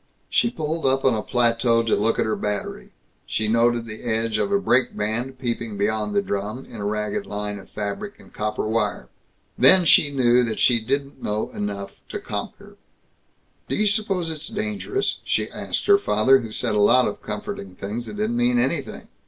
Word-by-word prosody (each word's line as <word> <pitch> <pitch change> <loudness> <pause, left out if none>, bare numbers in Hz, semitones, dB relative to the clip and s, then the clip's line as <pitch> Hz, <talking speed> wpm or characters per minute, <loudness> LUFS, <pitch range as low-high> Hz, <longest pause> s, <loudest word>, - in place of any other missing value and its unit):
She 235 - +3
pulled 160 -5 -3
up 135 +1 +1
on 130 - +5
a 110 - -1
plateau 115 0 +2
to 115 - +2
look 110 +2 +1
at - - +1
her 110 - 0
battery. 105 -1 -4 0.4
She 110 - -1
noted 115 +1 +2
the 110 -1 -7
edge 115 -2 0
of 200 - 0
a 200 - +4
brake 125 -9 +2
band 120 +5 -2
peeping 115 -4 -3
beyond 110 - -1
the 200 - +3
drum, 105 - -4
in 115 - -10
a 100 - -4
ragged 105 0 -2
line 105 0 -3
of 95 - -15
fabric 105 - -5
and - - -17
copper 105 0 -2
wire. 110 -2 -1 0.5
Then 185 -2 +7
she 155 -2 +6
knew 125 -3 +3
that 115 -2 -2
she 120 -2 +4
didn't 140 +2 -2
know 105 +1 -2
enough 100 -1 -4 0.2
to - - -4
conquer. - - -7 0.9
"Do - - 0
you 215 - +1
suppose 200 -5 0
it's 155 -1 -6
dangerous?" 215 - -2
she - - -1
asked - - -3
her 405 -1 +6
father, 135 - +4
who 115 -3 -7
said - - -1
a 105 - +2
lot 125 +5 +5
of - - -5
comforting 95 -2 -6
things 105 +6 -5
that 210 - -7
didn't 215 +3 -1
mean 245 0 +2
anything. 245 - -1
120 Hz, 195 wpm, -23 LUFS, 105-155 Hz, 0.9 s, Then